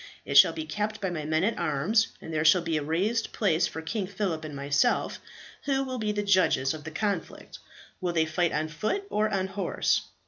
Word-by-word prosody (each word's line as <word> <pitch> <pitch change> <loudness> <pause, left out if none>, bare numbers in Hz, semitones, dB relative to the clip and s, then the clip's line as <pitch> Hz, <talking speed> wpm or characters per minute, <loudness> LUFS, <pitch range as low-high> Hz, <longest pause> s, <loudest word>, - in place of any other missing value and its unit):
It - - -4
shall - - +9
be 320 - -5
kept 215 -5 -3
by 190 -3 -2
my 155 -3 -4
men 155 +2 +1
at 225 +4 0
arms, 195 +11 +2
and 160 - -8
there 155 -1 +1
shall 165 +2 +5
be 165 -1 -1
a 150 - 0
raised 190 +10 -1
place 175 -5 +2
for 160 - -7
King 200 +3 -3
Phillip 190 -5 -3
and 150 -2 -7
myself, 140 +1 +1 0.5
who 270 -1 +1
will 255 -2 -4
be 215 -1 0
the 205 0 -2
judges 185 -9 +3
of 155 -1 -9
the - - -4
conflict. 195 +1 -4 0.4
Will 180 -1 0
they 160 -1 +2
fight 165 +2 0
on 155 +1 -1
foot 215 - -2
or 215 +1 +1
on 195 -3 0
horse?" 190 - 0
180 Hz, 215 wpm, -27 LUFS, 155-210 Hz, 0.5 s, shall